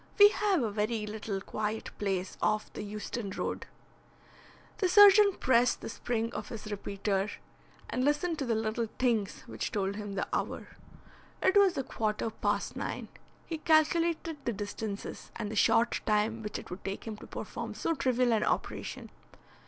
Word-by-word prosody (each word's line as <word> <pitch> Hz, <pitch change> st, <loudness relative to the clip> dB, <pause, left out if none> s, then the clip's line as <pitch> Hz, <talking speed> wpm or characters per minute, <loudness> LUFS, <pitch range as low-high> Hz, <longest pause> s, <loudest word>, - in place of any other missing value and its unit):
We 410 Hz, -1 st, +10 dB
have 400 Hz, -, +1 dB
a 220 Hz, -, -1 dB
very 210 Hz, +1 st, -1 dB
little 210 Hz, -1 st, -4 dB
quiet 215 Hz, +2 st, -3 dB
place 190 Hz, -2 st, -1 dB
off 215 Hz, 0 st, 0 dB
the -, -, -5 dB
Euston 210 Hz, +1 st, -4 dB
Road." 190 Hz, -, -3 dB, 1.1 s
The 370 Hz, -, +2 dB
surgeon 405 Hz, +1 st, +8 dB
pressed 245 Hz, -1 st, +3 dB
the -, -, -5 dB
spring 230 Hz, 0 st, -2 dB
of 215 Hz, -, -5 dB
his 215 Hz, -1 st, -7 dB
repeater 200 Hz, 0 st, -1 dB, 0.6 s
and 255 Hz, -, -1 dB
listened 300 Hz, +4 st, +1 dB
to 275 Hz, -, -1 dB
the 230 Hz, -, +2 dB
little 220 Hz, +1 st, -1 dB
tings 230 Hz, -6 st, 0 dB
which -, -, -4 dB
told 200 Hz, -1 st, -1 dB
him 205 Hz, -1 st, -5 dB
the 195 Hz, -, -2 dB
hour. -, -, -2 dB, 0.7 s
It 380 Hz, -, +4 dB
was 395 Hz, -3 st, +5 dB
a 270 Hz, -, 0 dB
quarter 220 Hz, -1 st, -2 dB
past -, -, -1 dB
nine. -, -, -4 dB, 0.4 s
He 325 Hz, -2 st, -4 dB
calculated 325 Hz, +1 st, +2 dB
the 235 Hz, -, -1 dB
distances, 205 Hz, 0 st, -5 dB
and 210 Hz, -2 st, -4 dB
the -, -, -4 dB
short 230 Hz, +2 st, +3 dB
time 215 Hz, +1 st, +2 dB
which 210 Hz, -1 st, -4 dB
it -, -, -10 dB
would 180 Hz, -, -7 dB
take 195 Hz, +1 st, -4 dB
him 220 Hz, -2 st, -4 dB
to -, -, -11 dB
perform -, -, -6 dB
so 330 Hz, -, 0 dB
trivial 255 Hz, -4 st, +2 dB
an 215 Hz, -, +2 dB
operation. -, -, -2 dB
225 Hz, 170 wpm, -31 LUFS, 210-285 Hz, 1.1 s, We